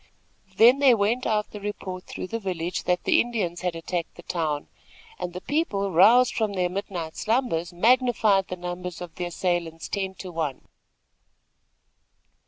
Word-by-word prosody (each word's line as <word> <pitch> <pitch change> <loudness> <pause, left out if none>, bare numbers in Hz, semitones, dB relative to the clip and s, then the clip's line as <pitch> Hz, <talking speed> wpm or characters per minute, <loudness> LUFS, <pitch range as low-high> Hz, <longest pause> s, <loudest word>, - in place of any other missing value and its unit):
Then 240 +6 +7
there 260 -4 +6
went 220 +5 +1
out 210 -1 0
the 210 - -7
report 190 -3 -5
through - - -6
the 225 +5 -4
village 180 -3 -3
that 180 0 +1
the - - +4
Indians 205 -8 -2
had 180 -2 -2
attacked 165 +1 -4
the 175 - -12
town, 155 -5 -2 0.5
and 175 - -3
the 180 +1 -7
people, 205 - -1
roused 225 +9 +6
from 215 -3 -1
their 180 -2 0
midnight 180 -4 -5
slumbers, 220 -8 0
magnified 220 -1 +3
the 185 - -4
numbers 180 0 -5
of 175 -2 -8
the 180 - -4
assailants 175 -2 -2
ten 190 -2 -3
to 185 0 -8
one. 160 -5 -3
185 Hz, 160 wpm, -25 LUFS, 175-215 Hz, 0.5 s, Then